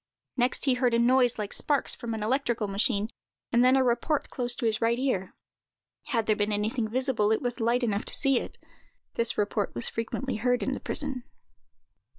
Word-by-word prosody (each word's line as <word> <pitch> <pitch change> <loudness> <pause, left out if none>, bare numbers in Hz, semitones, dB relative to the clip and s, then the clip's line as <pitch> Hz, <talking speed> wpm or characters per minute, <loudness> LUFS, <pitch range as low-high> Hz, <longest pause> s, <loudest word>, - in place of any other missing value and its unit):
Next 250 +2 +1
he 265 - +3
heard 250 -2 +1
a - - +3
noise, 245 +1 +4
like 210 -2 -4
sparks 290 -2 +2
from 230 -1 -4
an 215 - -4
electrical 240 -2 0
machine, 205 +1 0 0.4
and 240 0 +4
then 255 +1 +5
a 265 - +4
report 260 +5 0
close 245 -1 +2
to 245 - -4
his 220 0 0
right 230 +1 +2
ear. 245 -8 -2 0.7
Had 230 -4 0
there 215 - +2
been 205 0 -1
anything 220 +3 -1
visible, 235 -3 0
it 220 - +2
was 245 0 -2
light 235 +2 +1
enough 210 -3 -1
to - - 0
see 275 -3 +2
it. - - -8 0.6
This 230 0 0
report 205 - -1
was 120 - +1
frequently 230 +2 -3
heard 245 +2 0
in 270 - -1
the - - -4
prison. 275 -3 -2
235 Hz, 195 wpm, -27 LUFS, 215-255 Hz, 0.7 s, then